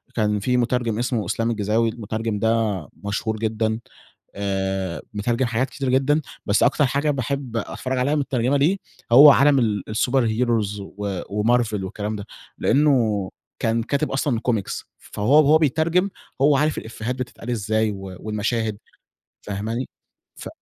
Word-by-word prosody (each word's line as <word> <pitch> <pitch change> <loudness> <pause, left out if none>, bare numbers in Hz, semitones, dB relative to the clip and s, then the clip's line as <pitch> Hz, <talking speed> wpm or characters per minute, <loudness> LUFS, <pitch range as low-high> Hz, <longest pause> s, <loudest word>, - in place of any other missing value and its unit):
كان 105 -2 +1
في 125 +5 +1
مترجم 120 -2 0
اسمه 120 -3 -1
إسلام 115 +6 -1
الجيزاوي، 110 +1 +1
المترجم 110 -1 -3
ده 110 -3 +1 0.2
مشهور 110 +2 -2
جدًا. 110 0 -1 0.6
آآ 95 -2 -2
مترجم 115 +5 0
حاجات 120 +2 -1
كتير 135 +2 -3
جدًا، 135 +4 +2 0.2
بس 100 0 +2
أكتر 145 - +3
حاجة 140 +4 +1
باحب 135 -2 -3
أتفرج 130 +4 -3
عليها 140 +4 +1
متترجمة 135 -2 +1
ليه 160 +8 +2 0.3
هو 145 +4 +10
عالم 140 0 +5
ال 105 -4 0
الsuper 125 +4 +2 0.2
heros 110 -4 0
و 100 -1 -5
وMarvel 110 +2 +1
والكلام 105 +2 -4
ده. 100 -1 -6 0.3
لأنه 115 -9 +2 0.3
كان 115 0 0
كاتب 140 +4 -1
أصلًا 135 -3 0
comics 110 -5 -1 0.2
فهو 125 +9 +2
وهو 150 +2 +6
بيترجم، 160 +5 +2 0.3
هو 140 0 +5
عارف 150 +2 +1
الإفيهات 115 +2 -4
بتتقال 125 -1 -7
إزاي 110 -1 0
و 95 -2 -8
والمشاهد، 110 +1 -2 0.7
فاهماني. 110 +5 -3 0.5
ف - - -9
115 Hz, 145 wpm, -22 LUFS, 105-130 Hz, 0.7 s, هو